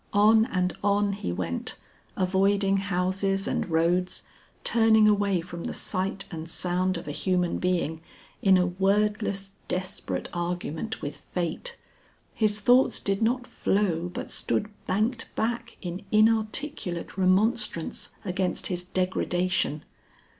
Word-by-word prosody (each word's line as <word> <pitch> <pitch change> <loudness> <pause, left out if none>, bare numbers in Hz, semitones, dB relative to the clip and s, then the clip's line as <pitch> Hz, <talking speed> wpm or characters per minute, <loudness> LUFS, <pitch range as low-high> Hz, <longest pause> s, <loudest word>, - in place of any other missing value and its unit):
On 215 +2 +6
and 180 -5 0
on 205 0 +2
he 195 - -3
went, 85 -1 -3 0.4
avoiding 195 +1 +2
houses 195 +1 0
and - - -1
roads, 170 +3 +1 0.4
turning 220 -2 +5
away 200 -3 +2
from 170 0 -7
the - - -3
sight 195 +1 -1
and 165 -1 -6
sound 180 +2 +1
of 170 - -8
a - - -2
human 180 +2 0
being 170 -3 0 0.4
in 190 -1 +6
a 180 - +3
wordless 195 +2 0 0.2
desperate 185 +1 -3
argument 175 +4 -3
with 145 0 -4
Fate. 180 - -4 0.6
His 215 -2 +1
thoughts 245 +5 +4
did 195 +1 -1
not 245 +3 +1
flow 180 -7 0
but - - -6
stood 210 - 0 0.2
banked 225 +5 0
back 235 +1 -2
in 180 +1 -4
inarticulate 215 - +1
remonstrance 190 -1 +1 0.2
against 185 0 -1
his 180 0 -2
degradation. 185 -3 0
190 Hz, 125 wpm, -27 LUFS, 180-210 Hz, 0.6 s, On